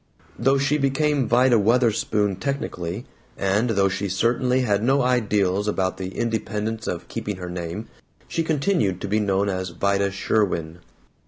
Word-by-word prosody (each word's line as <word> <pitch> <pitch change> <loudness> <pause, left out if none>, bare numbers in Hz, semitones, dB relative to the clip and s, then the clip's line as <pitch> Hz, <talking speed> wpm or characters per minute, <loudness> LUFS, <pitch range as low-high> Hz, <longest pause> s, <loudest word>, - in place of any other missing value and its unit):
Though 135 +3 +3
she 140 +2 +1
became 140 0 +1
Vida 120 -1 +4
Wutherspoon 105 -3 +2
technically, 105 -6 -4 0.3
and 100 +5 +1
though 100 -3 +3
she 100 +1 -2
certainly 125 +6 +1
had 105 -5 +1
no 135 +4 +3
ideals 105 -5 +1
about 95 -3 0
the 95 0 -6
independence 110 -1 -2
of 85 - -4
keeping 105 -3 -4
her 90 -1 -7
name, 90 +5 -5 0.4
she 165 - -1
continued 150 - +1
to - - -3
be 105 +2 +1
known 100 -1 +1
as 95 -1 -2
Vida 100 +3 +1
Sherwin. 95 -4 -1
105 Hz, 150 wpm, -23 LUFS, 95-125 Hz, 0.4 s, Vida